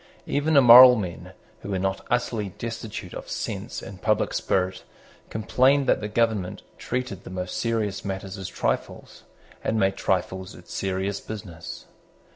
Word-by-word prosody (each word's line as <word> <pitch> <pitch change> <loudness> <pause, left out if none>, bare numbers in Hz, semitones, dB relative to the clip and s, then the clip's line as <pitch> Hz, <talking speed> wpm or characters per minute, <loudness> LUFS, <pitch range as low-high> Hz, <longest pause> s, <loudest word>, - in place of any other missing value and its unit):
Even 145 +1 +1
immoral 125 -1 +10
men, 90 -7 -5 0.3
who - - -8
were 95 - -1
not 95 +1 -2
utterly 115 -4 0
destitute 115 -1 -6
of - - -8
sense - - -4
and 95 -2 -10
public 110 -1 +1
spirit, 95 0 -1 0.5
complained 130 +6 +2
that - - +2
the 105 - -3
government 105 -4 0 0.2
treated 125 -7 -4
the - - -9
most 90 0 -5
serious 110 -4 -1
matters 95 0 -5
as 95 -2 -6
trifles, - - -3 0.4
and 110 - 0
made 95 -1 +2
trifles 95 0 -2
its 90 - -12
serious 95 +1 -2
business. 95 -7 -8
100 Hz, 145 wpm, -25 LUFS, 95-115 Hz, 0.5 s, immoral